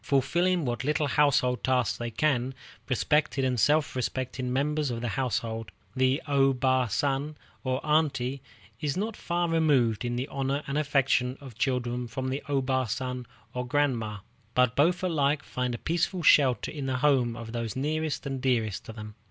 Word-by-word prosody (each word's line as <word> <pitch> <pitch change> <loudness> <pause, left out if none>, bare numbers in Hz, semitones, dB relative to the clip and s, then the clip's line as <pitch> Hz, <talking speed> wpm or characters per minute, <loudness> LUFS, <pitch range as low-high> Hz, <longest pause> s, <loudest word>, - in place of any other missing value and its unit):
Fulfilling 170 +5 +2
what 120 -1 -2
little 150 +2 +1
household 135 -3 +2
tasks 125 -5 +2
they 120 0 -3
can, 130 +1 0 0.3
respected 140 +1 +1
and 125 -2 0
self 150 +6 +3
respecting 130 0 -2
members 150 +2 0
of 120 -1 -3
the 120 - -2
household, 115 -3 -2 0.2
the 130 +2 +2
O 135 -2 +3
Bă 130 -1 +2
San, 140 +6 -1 0.3
or 130 0 0
Aunty, 140 -4 +1 0.4
is 150 +2 -2
not 215 +2 -2
far 175 0 -1
removed 145 -10 +2
in 120 0 -2
the 125 +3 -2
honor 140 +1 -1
and 140 - -4
affection 135 -3 +1
of 135 -4 -10
the 110 - -25
children 125 -2 -1
from 130 +3 -4
the 135 +2 -2
O 140 -2 +1
Bā 130 -2 0
San, 125 0 -3 0.3
or 125 - -2
Grandma, 120 -7 0 0.3
but 125 -1 +3
both 175 +6 +3
alike 150 -5 +1
find 125 -1 -2
a - - -5
peaceful 170 - -1
shelter 135 -5 +4
in 145 -3 -5
the 130 -1 0
homes 125 -4 +2
of 115 -1 -7
those 115 -2 -3
nearest 155 +2 -2
and 135 -2 -3
dearest 115 -6 0
to 110 - -8
them. 105 -1 -8
130 Hz, 175 wpm, -28 LUFS, 125-145 Hz, 0.4 s, shelter